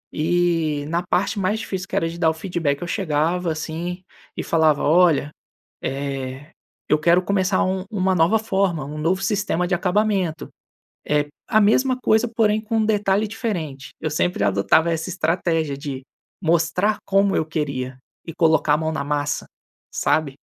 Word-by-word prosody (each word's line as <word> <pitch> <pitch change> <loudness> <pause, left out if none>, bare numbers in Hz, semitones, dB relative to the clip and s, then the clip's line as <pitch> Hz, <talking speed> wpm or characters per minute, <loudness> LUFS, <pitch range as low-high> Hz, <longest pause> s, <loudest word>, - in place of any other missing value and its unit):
E 165 -3 +1
na 170 +1 0
parte 180 +4 0
mais 205 +3 0
difícil, 190 -3 -5
que - - -5
era 165 - +1
de 170 - -8
dar 165 -2 +4
o 160 - 0
feedback, 160 -5 -2
eu 175 - -4
chegava 170 +1 0
assim 170 +3 -5 0.3
e - - -2
falava: 155 -3 +2
"Olha, 160 -2 +4 0.5
eh, 135 +1 -4 0.4
eu 150 - +3
quero 170 +3 +4
começar 190 -1 +1
u 185 0 -1
uma 190 -2 +1
nova 180 +6 +3
forma, 190 -8 0
um 150 +2 -7
novo 180 +5 0
sistema 190 -3 0
de 175 - +1
acabamento. 185 -2 0 0.6
Eh, 150 0 +1 0.2
a 215 -1 +4
mesma 255 +5 +3
coisa, 220 0 +2
porém, 220 -2 +1
com 225 +1 -2
um 220 - +2
detalhe 205 -1 +1
diferente". 175 - -4
Eu 155 - -1
sempre 155 - 0
adotava 100 - +3
essa 165 +2 -2
estratégia 165 -4 0
de 140 -2 -6 0.4
mostrar 170 +5 +1
como 195 0 +2
eu 155 - +1
queria 140 -5 -3 0.3
e 165 - -7
colocar 160 -3 +3
a - - +4
mão 160 0 -1
na 155 - -2
massa, 145 0 -2 0.5
sabe? 145 -4 0
170 Hz, 165 wpm, -22 LUFS, 155-195 Hz, 0.6 s, dar